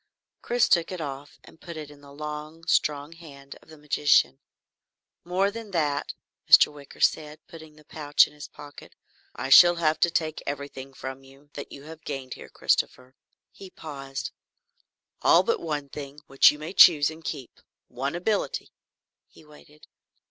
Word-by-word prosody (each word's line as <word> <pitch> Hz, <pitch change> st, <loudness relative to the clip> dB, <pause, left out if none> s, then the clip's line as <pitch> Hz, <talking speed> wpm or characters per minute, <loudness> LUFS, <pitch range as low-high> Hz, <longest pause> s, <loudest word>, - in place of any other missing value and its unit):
Chris 240 Hz, -1 st, +1 dB
took 170 Hz, 0 st, +2 dB
it 185 Hz, -, -5 dB
off 140 Hz, -2 st, -7 dB
and 160 Hz, -, -18 dB
put 170 Hz, -2 st, -9 dB
it 150 Hz, -2 st, -8 dB
in 145 Hz, -1 st, -17 dB
the 140 Hz, -1 st, -15 dB
long, 150 Hz, +2 st, -8 dB
strong 145 Hz, -1 st, 0 dB
hand 140 Hz, -4 st, -13 dB
of -, -, -23 dB
the 155 Hz, -, -14 dB
magician. 145 Hz, -2 st, +2 dB, 0.8 s
"More 185 Hz, +3 st, 0 dB
than 225 Hz, 0 st, -9 dB
that," 150 Hz, -6 st, -2 dB, 0.3 s
Mr. -, -, +7 dB
Wicker 145 Hz, -1 st, -14 dB
said, 150 Hz, -1 st, +1 dB
putting 160 Hz, -3 st, -14 dB
the 150 Hz, 0 st, -20 dB
pouch 145 Hz, -1 st, +3 dB
in -, -, -14 dB
his 150 Hz, 0 st, -10 dB
pocket, 145 Hz, -1 st, -14 dB, 0.4 s
"I 135 Hz, -, -5 dB
shall 175 Hz, +5 st, +8 dB
have 155 Hz, -2 st, 0 dB
to 175 Hz, -, +3 dB
take 160 Hz, -2 st, -2 dB
everything 140 Hz, -1 st, -7 dB
from 130 Hz, +1 st, -8 dB
you 135 Hz, +2 st, -20 dB
that 145 Hz, -, -8 dB
you 140 Hz, -, -11 dB
have 160 Hz, +1 st, -12 dB
gained 135 Hz, -3 st, -6 dB
here, -, -, -12 dB
Christopher." 130 Hz, 0 st, -1 dB, 0.4 s
He 195 Hz, -, -13 dB
paused. 135 Hz, -5 st, -7 dB, 0.9 s
"All -, -, +5 dB
but 465 Hz, -, 0 dB
one 150 Hz, -3 st, -4 dB
thing 140 Hz, 0 st, -9 dB
which 135 Hz, 0 st, +6 dB
you 150 Hz, -, -3 dB
may 155 Hz, +4 st, -7 dB
choose 160 Hz, -6 st, +7 dB
and 160 Hz, +1 st, -13 dB
keep 140 Hz, -7 st, -7 dB, 0.3 s
one 135 Hz, +5 st, -4 dB
ability." 200 Hz, +4 st, -2 dB, 0.6 s
He 155 Hz, -, -20 dB
waited. 150 Hz, 0 st, -18 dB
150 Hz, 170 wpm, -25 LUFS, 140-160 Hz, 0.9 s, shall